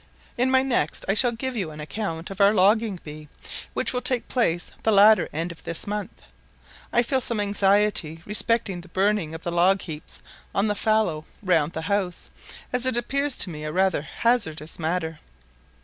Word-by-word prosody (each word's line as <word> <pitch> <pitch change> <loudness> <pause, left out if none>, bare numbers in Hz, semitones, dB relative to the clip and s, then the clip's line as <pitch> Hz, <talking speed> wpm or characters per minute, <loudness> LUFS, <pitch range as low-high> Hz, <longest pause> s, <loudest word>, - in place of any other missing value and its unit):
In 250 +2 +1
my 260 0 +4
next 240 - 0
I 195 - +2
shall 245 +3 +3
give 255 +2 -4
you 190 -8 -2
an 155 0 -10
account 165 +1 -5
of 195 - -4
our 200 +2 +5
logging 205 0 +3
bee, 150 0 -9 0.5
which - - +1
will 250 - -1
take 255 -4 +1
place 175 -9 0
the 220 - +2
latter 210 +1 +6
end 165 +3 -3
of 170 - -13
this 165 - -1
month. 205 -1 -5 0.7
I 240 - +4
feel 260 +2 0
some 235 -3 -1
anxiety 200 -5 +2
respecting 210 -3 0
the 175 - -14
burning 190 -5 0
of 160 - -9
the 175 - -3
log 185 +3 +3
heaps 155 -1 -8 0.3
on 195 - +2
the 210 - +1
fallow 205 -7 0 0.2
round 170 -4 +2
the 160 - -4
house, 185 0 -2 0.4
as 250 +1 +1
it 255 - +1
appears 275 +3 -1
to 185 - +2
me 150 -1 -7
rather 185 +2 +1
a 145 - -11
hazardous 165 -11 0
matter. 160 -1 -2
195 Hz, 185 wpm, -24 LUFS, 165-225 Hz, 0.7 s, latter